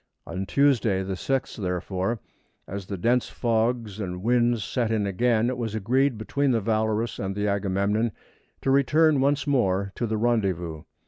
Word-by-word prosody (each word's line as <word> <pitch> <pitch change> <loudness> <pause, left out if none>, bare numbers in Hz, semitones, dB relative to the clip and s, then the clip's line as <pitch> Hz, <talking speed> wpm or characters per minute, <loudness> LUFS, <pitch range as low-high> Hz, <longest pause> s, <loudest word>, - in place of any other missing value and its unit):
On 95 +3 -4
Tuesday, 120 -9 +2
the 95 0 -3
6th, 135 +8 -2
therefore, 95 +3 -2 0.5
as 100 -1 -6
the 100 - -4
dense 120 +7 +1
fogs 115 -2 -1
and 90 -2 -4
winds 120 -1 +2
set 120 +1 -1
in 110 -2 +1
again 115 +3 +2
it 125 0 -2
was 110 -2 -3
agreed 125 +4 +1
between 140 +6 0
the 120 -3 +3
Valorous 110 +1 0
and 95 0 -3
Agamemnon 100 +2 0 0.5
to 135 - +2
return 145 +2 +4
once 140 +1 +2
more 100 -9 +1
to 120 - -2
the 110 0 -1
rendezvous. 95 -9 0
110 Hz, 155 wpm, -25 LUFS, 100-125 Hz, 0.5 s, return